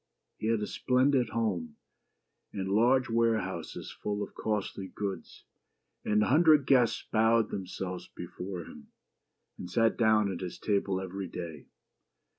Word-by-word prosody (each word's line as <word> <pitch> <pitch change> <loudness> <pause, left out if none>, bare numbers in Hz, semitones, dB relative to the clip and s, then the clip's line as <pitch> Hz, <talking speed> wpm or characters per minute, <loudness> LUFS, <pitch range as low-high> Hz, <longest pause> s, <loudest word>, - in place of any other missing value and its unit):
He 110 - -2
had 115 -1 +1
a - - 0
splendid 130 +1 +2
home, 90 -9 -2 0.8
and 95 -1 -3
large 120 +5 +4
ware 115 -1 +2
houses - - -6
full 105 0 -3
of - - -8
costly 100 -2 -3
goods; 100 +1 -6 0.6
and 105 0 +2
a - - 0
hundred 155 0 +5
guests 125 -4 +3
bowed 110 0 +3
themselves 95 -1 -5
before 90 -2 -7
him, - - -13 0.7
and 90 - -7
sat 115 +3 +2
down 110 -3 +3
at 90 - -5
his 90 -2 -5
table 100 -2 0
every 95 +1 -5
day. 80 -5 -7
105 Hz, 140 wpm, -30 LUFS, 95-115 Hz, 0.8 s, hundred